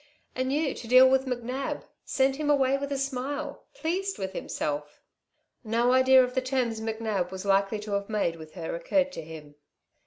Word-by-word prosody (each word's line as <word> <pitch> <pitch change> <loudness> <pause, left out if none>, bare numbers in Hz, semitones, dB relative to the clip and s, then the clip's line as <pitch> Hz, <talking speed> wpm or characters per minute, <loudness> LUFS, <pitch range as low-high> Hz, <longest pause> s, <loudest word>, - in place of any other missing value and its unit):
And 260 +1 -1
you 295 0 +1
to 235 - -9
deal 255 +2 +8
with 265 0 +2
McNab 250 +2 -3 0.2
send 270 0 +1
him 300 -1 -1
away 275 -2 +3
with 280 +1 -4
a 280 - 0
smile 270 +1 -4
pleased 385 +2 -2
with 190 0 -4
himself." 150 -4 -4 0.6
No 235 +2 +2
idea 260 0 +6
of 250 0 -3
the 260 - +1
terms 255 -4 -1
McNab 220 -5 -2
was 190 +1 -7
likely 195 +1 +2
to 210 0 -7
have 200 +1 -1
made 200 -6 0
with 155 +1 -12
her 165 -3 -4
occurred 275 - +1
to 275 - -6
him. 155 -2 -10
250 Hz, 185 wpm, -27 LUFS, 195-270 Hz, 0.6 s, deal